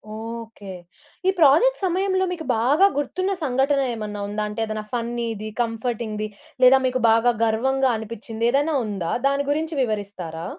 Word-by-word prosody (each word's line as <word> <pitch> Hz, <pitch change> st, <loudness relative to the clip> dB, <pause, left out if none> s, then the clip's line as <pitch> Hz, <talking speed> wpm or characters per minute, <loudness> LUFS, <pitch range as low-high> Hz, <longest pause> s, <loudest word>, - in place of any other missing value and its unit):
Okay. 225 Hz, -3 st, -7 dB, 0.5 s
ఈ -, -, +6 dB
project 330 Hz, -, +5 dB
సమయంలో, 375 Hz, +1 st, +1 dB
మీకు 320 Hz, -3 st, -7 dB
బాగా 290 Hz, -, +4 dB
గుర్తున్న 370 Hz, +7 st, -1 dB
సంఘటన 270 Hz, +1 st, +2 dB
ఏమైనా 210 Hz, -2 st, -5 dB
ఉందా? 210 Hz, +1 st, -3 dB
అంటే, 210 Hz, +2 st, -6 dB
ఏదైనా 215 Hz, -1 st, -5 dB
ఫన్నీది, 230 Hz, -2 st, -3 dB
కంఫర్టింగ్‌ది. 225 Hz, -2 st, -3 dB, 0.4 s
లేదా, 260 Hz, +1 st, +8 dB
మీకు 255 Hz, 0 st, -1 dB, 0.4 s
గర్వంగా 265 Hz, +4 st, +2 dB
అనిపించింది, 225 Hz, +1 st, -5 dB
ఏదైనా 290 Hz, +4 st, +1 dB
ఉందా? 195 Hz, -5 st, -3 dB, 0.2 s
దాని 280 Hz, 0 st, 0 dB
గురించి 315 Hz, +2 st, -1 dB
వివరిస్తారా? 200 Hz, -7 st, -4 dB
235 Hz, 130 wpm, -23 LUFS, 215-280 Hz, 0.5 s, లేదా